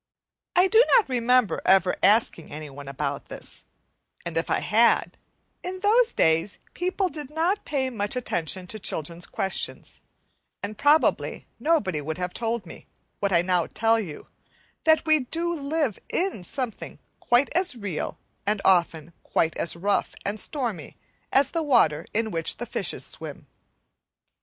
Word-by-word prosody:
I 360 +2 +5
do 450 +5 +6
not 465 -5 +5
remember 250 -5 +2
ever 190 -1 +4
asking 200 -5 +3
anyone 145 -2 -8
about 140 +1 -3
this; - - -6 0.6
and 170 -1 -5
if 165 - -1
I - - +2
had, 225 +4 +3 0.5
in 370 +1 -5
those 450 +4 +4
days 160 +4 +2 0.2
people 370 +2 0
did 295 -5 -7
not 335 +7 0
pay 270 -3 0
much 205 -2 -1
attention 185 -6 -2
to 215 +4 -5
children's 170 -2 -3
questions, 190 0 -3 0.6
and 205 +1 -4
probably 295 +7 +2
nobody 210 - +1
would 155 +3 -4
have 180 0 -3
told 230 -2 -2
me, 165 - -12 0.3
what 200 -1 0
I 170 -1 +4
now 180 -2 +1
tell 225 +1 +2
you, 170 -9 -6 0.6
that 315 -1 +4
we 310 -1 +5
do 330 +6 -2
live 290 - -1
in 365 - -1
something 250 +3 -4 0.2
quite 245 +3 +2
as 355 -5 +1
real 200 -8 -4 0.3
and 210 +1 0
often 170 -3 +2
quite 160 0 0
as 170 - -1
rough 200 +4 0
and 205 +2 -2
stormy 230 - -3 0.3
as 270 0 +3
the 330 - -1
water 235 - +3
in 220 0 -1
which 165 -2 -1
the 240 - -4
fishes - - -2
swim. - - -6
220 Hz, 150 wpm, -25 LUFS, -, 0.6 s, do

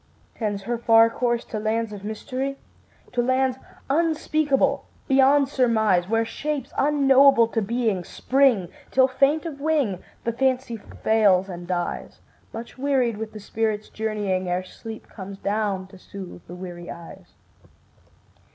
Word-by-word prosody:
Tends 205 -3 -3
her 235 +2 -2
far 230 -1 +5
course 240 -1 -1
to 215 - -4
lands 220 0 -1
of 200 -1 -9
mystery? 255 +6 -4 0.5
To 245 - +1
lands 260 +1 +1 0.3
unspeakable 310 -2 +1 0.2
beyond 270 +1 +5
surmise, 220 -9 +2
Where 225 0 +2
shapes 280 +2 -4
unknowable 275 -3 +5
to 225 - -1
being 220 -3 0
spring, 250 -6 +2 0.2
Till, 260 0 +4
faint 275 +5 +2
of 285 -4 -6
wing, 285 - +1 0.2
the 235 - -1
Fancy 255 -1 0
fails 205 -3 +2
and 175 -1 -7
dies 175 -1 -3 0.3
Much 235 +3 -9
wearied 260 -5 +1
with 220 0 -5
the 215 - -9
spirit's 215 0 -2
journeying, 205 -4 -2
Ere 180 +1 0
sleep 220 +4 -10
comes 195 -1 -9
down 200 -2 -1
to 190 - -14
soothe 185 -2 -9
the 175 - -8
weary 175 -1 -8
eyes. 170 -1 -11
225 Hz, 140 wpm, -24 LUFS, 200-265 Hz, 0.5 s, far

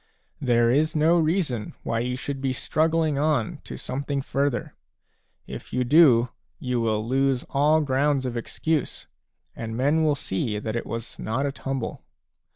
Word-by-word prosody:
There 120 -2 +3
is 155 +5 +2
no 160 +3 +4
reason 155 - 0
why 115 - -1
you 125 +2 -2
should 135 +1 -5
be 135 -1 0
struggling 155 +1 +1
on 145 -7 0
to - - -7
some 130 - -4
thing 140 -1 -2
further; 140 -1 -1 0.7
if - - -9
you 125 - +1
do, 125 -3 +5 0.3
you 125 -2 -1
will 110 -1 0
lose 135 0 +1
all 150 +3 +3
grounds 140 -1 +1
of 125 -1 -3
excuse, 150 +5 -2 0.5
and 115 0 -5
men 145 +5 +2
will 150 -2 +3
see 105 -3 -2
that 110 +1 -4
it 115 - -3
was 115 0 -6
not 115 +6 -1
a 140 - 0
tumble. 135 -2 -4
135 Hz, 160 wpm, -25 LUFS, 120-150 Hz, 0.7 s, do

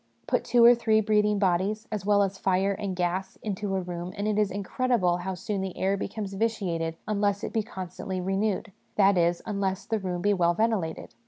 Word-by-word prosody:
Put - - 0
two 240 -1 +5
or 240 - +10
three 225 -2 +2
breathing 210 -1 +2
bodies, 200 +4 0
as 205 -2 -4
well 205 -1 +5
as 195 0 -3
fire 190 +1 +2
and 195 -1 -3
gas, 180 +2 -2
into 200 -1 -2
a 190 - 0
room, 175 0 -5
and 205 +1 -1
it 215 0 +1
is 210 -2 +2
incredible 200 -1 0
how 185 +1 -4
soon 195 +2 -3
the 190 -1 -5
air 195 +1 +1
becomes 200 0 -4
vitiated 185 -7 -1
unless 205 -1 0
it - - -4
be 225 - +2
constantly 190 -3 -6
renewed; 195 +3 -1 0.2
that 200 -1 +5
is, 170 0 +1
unless 200 -3 -2
the 220 - -1
room 180 -2 -3
be 205 0 +3
well 175 -2 +2
ventilated. 210 -7 -1
195 Hz, 200 wpm, -27 LUFS, 185-210 Hz, 0.2 s, or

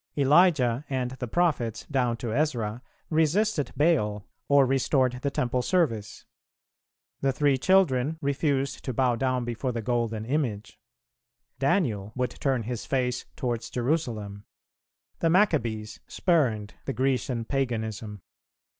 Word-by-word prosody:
Elijah 140 -4 +4
and 130 -2 -1
the 130 -1 -5
prophets 135 -7 0
down 125 -4 0
to 115 -2 -4
Ezra 120 -6 -1 0.3
resisted 160 +2 +1
Baal 105 - +2 0.2
or 140 -1 +5
restored 130 -1 +1
the 140 - 0
Temple 125 -2 -1
Service; 125 - -1 0.9
the 135 - +1
Three 140 +1 +2
Children 155 -3 +2
refused 140 -1 -1
to 130 - -3
bow 125 0 +2
down 130 0 0
before 120 +2 -2
the 115 -2 -4
golden 115 -2 -1
image; 120 -6 -2 0.8
Daniel 125 - 0
would 125 0 -1
turn 130 -4 -1
his 120 0 -4
face 125 -2 -1
towards 120 -2 -3
Jerusalem; 115 -7 -2 0.7
the 165 - +2
Maccabees 125 - +1
spurned 120 - +1
the - - -2
Grecian 130 -1 0
paganism. 110 -6 -3
125 Hz, 120 wpm, -27 LUFS, 115-145 Hz, 0.9 s, or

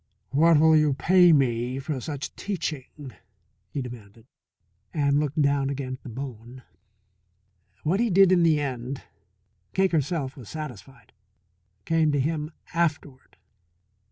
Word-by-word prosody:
"What 155 +3 +5
will 160 +1 +6
you 150 -3 +3
pay 180 +3 +5
me 125 -3 +1
for 135 -1 -4
such 145 +1 -6
teaching?" 150 -8 -5 0.6
he 140 - -4
demanded, 115 -3 -11 0.7
and 145 -2 +2
looked 150 +1 -2
down 140 -1 +2
again 135 -2 -4
at 130 - -9
the - - -10
bone. 125 0 -8 1.2
What 175 +6 +1
he 235 0 +2
did 195 0 +5
in 180 -2 +4
the 160 -3 +4
end, 130 -1 -4 0.7
Cake 190 0 +2
herself 145 -3 -1
was 120 -7 -11
satisfied 135 -6 -9 0.7
came 160 -2 +2
to 145 - +1
him 150 +2 -1 0.2
afterward. 150 -6 -2
145 Hz, 130 wpm, -25 LUFS, 130-160 Hz, 1.2 s, will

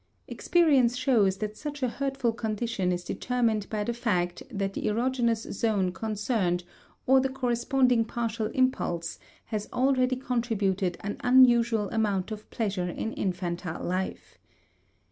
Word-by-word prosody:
Experience 275 -9 +3
shows 215 -8 +3
that 215 +1 -4
such 290 +2 -6
a - - +3
hurtful 270 -1 -1
condition 220 -4 -2
is 175 0 -2
determined 230 -4 -1
by 210 -1 -1
the 235 - -2
fact 180 -7 -1
that 195 -1 -2
the - - -3
erogenous 235 0 0
zone 205 -5 +1
concerned 210 -3 -1 0.4
or 265 +1 +6
the 265 0 0
corresponding 250 -1 +2
partial 230 -1 -2
impulse 215 -9 -1 0.3
has 210 -1 -4
already 255 0 +2
contributed 215 -8 -1
an 205 +1 -4
unusual 240 -4 +5
amount 210 -3 0
of 215 0 -7
pleasure 195 -6 -2
in 220 +5 -4
infantile 175 -3 -3
life. 185 +2 -4
225 Hz, 130 wpm, -28 LUFS, 195-250 Hz, 0.4 s, or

